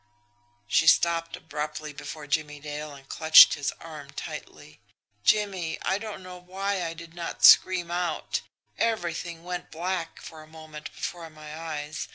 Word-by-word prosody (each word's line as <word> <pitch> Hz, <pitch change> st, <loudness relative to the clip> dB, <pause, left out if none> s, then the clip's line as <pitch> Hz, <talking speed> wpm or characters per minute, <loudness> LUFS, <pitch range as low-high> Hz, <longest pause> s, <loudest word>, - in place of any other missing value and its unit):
She 160 Hz, -, +2 dB
stopped 165 Hz, 0 st, +4 dB
abruptly 150 Hz, 0 st, -5 dB
before 150 Hz, +1 st, -8 dB
Jimmie 150 Hz, 0 st, -1 dB
Dale, 150 Hz, 0 st, -6 dB
and 135 Hz, -1 st, -15 dB
clutched 160 Hz, +2 st, +8 dB
his 145 Hz, -1 st, -2 dB
arm 155 Hz, -4 st, -10 dB
tightly. 140 Hz, -, -9 dB, 0.4 s
"Jimmie, 190 Hz, -, +1 dB
I 190 Hz, -, 0 dB
don't 215 Hz, -3 st, -7 dB
know 180 Hz, 0 st, -9 dB
why 190 Hz, +1 st, -3 dB
I 165 Hz, 0 st, -4 dB
did 165 Hz, 0 st, -11 dB
not 170 Hz, -1 st, -1 dB
scream 180 Hz, -2 st, +7 dB
out. 175 Hz, -2 st, -2 dB, 0.4 s
Everything 170 Hz, -6 st, -2 dB
went 180 Hz, 0 st, -5 dB
black 170 Hz, 0 st, -3 dB
for 160 Hz, -1 st, -10 dB
a 155 Hz, -, -14 dB
moment 155 Hz, -1 st, -10 dB
before 170 Hz, -2 st, -6 dB
my 155 Hz, -1 st, -10 dB
eyes. 155 Hz, -2 st, -5 dB
165 Hz, 150 wpm, -27 LUFS, 155-180 Hz, 0.4 s, clutched